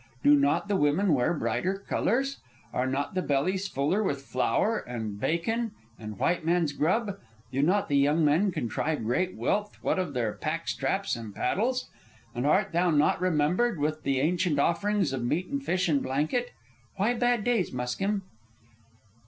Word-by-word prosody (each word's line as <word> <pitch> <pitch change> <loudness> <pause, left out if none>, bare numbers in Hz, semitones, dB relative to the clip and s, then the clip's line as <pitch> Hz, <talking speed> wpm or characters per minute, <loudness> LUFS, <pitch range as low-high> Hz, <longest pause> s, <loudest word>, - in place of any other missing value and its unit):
"Do 145 - +7
not 145 +6 +2
the 205 - +1
women 160 +3 +2
wear 125 0 +2
brighter 185 +5 -1
colors? 270 +5 0 0.3
Are 125 +1 0
not 135 +5 -2
the 185 - 0
bellies 185 +7 0
fuller 150 +7 0
with 140 -9 -2
flour 205 - +1
and 110 -4 -5
bacon 225 - -1 0.3
and 105 -2 -7
white 175 - +1
man's 165 -3 +1
grub? 200 +7 0 0.3
Do 135 - 0
not 185 +7 +2
the 140 - +2
young 150 +3 +3
men 170 +7 +3
contrive 145 +1 -2
great 180 +12 0
wealth 210 0 -1
what - - +1
of 170 -7 -3
their 115 -4 0
pack 165 +2 -4
straps 195 -5 -1
and 110 -3 -8
paddles? 245 - 0 0.5
And 120 +3 -1
art 195 +6 +2
thou 175 +2 +2
not 150 +2 +2
remembered 180 +6 +1
with 155 +1 -1
the 135 -1 0
ancient 170 0 +1
offerings 180 +1 +1
of 130 -2 -2
meat 155 +9 0
and 280 0 -3
fish 185 -5 0
and 145 -4 +2
blanket? 155 - -1 0.5
Why 205 +5 +1
bad 245 -2 +1
days, 235 -6 +1
Muskim?" 195 +12 -2
165 Hz, 170 wpm, -28 LUFS, 140-200 Hz, 0.5 s, Do